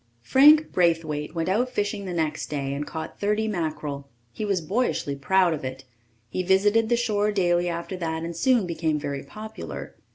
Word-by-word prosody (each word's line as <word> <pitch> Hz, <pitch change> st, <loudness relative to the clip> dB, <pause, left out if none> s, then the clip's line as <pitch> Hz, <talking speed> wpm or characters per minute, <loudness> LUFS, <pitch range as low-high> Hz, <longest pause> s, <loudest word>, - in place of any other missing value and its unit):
Frank 300 Hz, -, +6 dB
Braithwaite 165 Hz, -3 st, 0 dB
went 165 Hz, -1 st, -1 dB
out 225 Hz, +7 st, +1 dB
fishing 205 Hz, -4 st, -2 dB
the 185 Hz, -, -4 dB
next 160 Hz, -3 st, -2 dB
day 140 Hz, -2 st, -2 dB
and 145 Hz, +1 st, -4 dB
caught 160 Hz, -, -6 dB
30 210 Hz, +2 st, +1 dB
mackerel. 155 Hz, -7 st, -3 dB, 0.2 s
He -, -, -5 dB
was 200 Hz, -3 st, +1 dB
boyishly 180 Hz, -, -1 dB
proud 180 Hz, +5 st, +3 dB
of 150 Hz, -, -5 dB
it. 130 Hz, +1 st, -5 dB, 0.4 s
He 185 Hz, -, -2 dB
visited 205 Hz, +4 st, +3 dB
the 240 Hz, -, +3 dB
shore 210 Hz, -3 st, +1 dB
daily 175 Hz, -3 st, +2 dB
after 170 Hz, +2 st, -4 dB
that 160 Hz, -2 st, -3 dB
and 170 Hz, 0 st, -5 dB
soon 240 Hz, +3 st, +3 dB
became 165 Hz, -3 st, -1 dB
very 140 Hz, -1 st, -4 dB
popular. 215 Hz, +9 st, -8 dB
175 Hz, 175 wpm, -25 LUFS, 155-210 Hz, 0.4 s, Frank